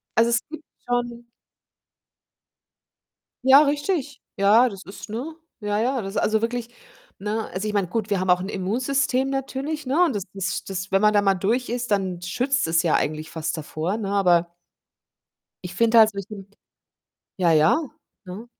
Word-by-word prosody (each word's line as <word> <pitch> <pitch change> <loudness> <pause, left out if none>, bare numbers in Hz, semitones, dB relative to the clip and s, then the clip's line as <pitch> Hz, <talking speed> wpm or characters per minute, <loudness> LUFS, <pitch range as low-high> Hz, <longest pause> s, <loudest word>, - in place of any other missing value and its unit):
Also, 230 +1 +4
es 230 - +3
gibt 315 0 -9 0.2
schon 240 -1 -2 2.2
Ja, 270 +2 +9
richtig. 290 -1 -1 0.2
Ja, 220 +5 +5
das 195 -1 -10
ist 200 +2 -10
ne? 280 +9 -5 0.2
Ja, 205 0 -1
ja, 250 +2 0
das 195 0 -6
also, 215 0 +1
wirklich, 235 0 -3 0.5
ne? 210 +3 -3
Also, 195 +4 -3
ich 210 - -4
meine, 195 -4 0
gut, 215 +2 -2
wir 200 -2 +1
haben 185 0 0
auch 180 0 +4
'n 190 - -5
Immunsystem 255 +7 0
natürlich, 275 +3 -3
ne? 285 +8 +2
Und 325 -12 +2
das 195 - -3
das 195 -1 -3
das, 190 0 -5
wenn 195 +1 +2
man 210 0 +5
da 205 - +4
mal 195 -1 +2
durch 225 +7 -1
ist, 240 -1 -3
dann 185 -3 -1
schützt 250 +7 0
es 165 +1 +2
ja 165 - +1
eigentlich 155 +1 -1
fast 160 0 -3
davor, 160 +7 -3
ne? 200 -3 -4
Aber 175 -4 +2 1.1
ich 180 +1 -7
finde 230 +2 +4
halt 220 -1 +7
solche 200 0 -8 0.9
Ja, 170 -3 +3
ja, 155 - +4 0.5
ne? 200 +6 -8
210 Hz, 170 wpm, -23 LUFS, 190-245 Hz, 2.2 s, Ja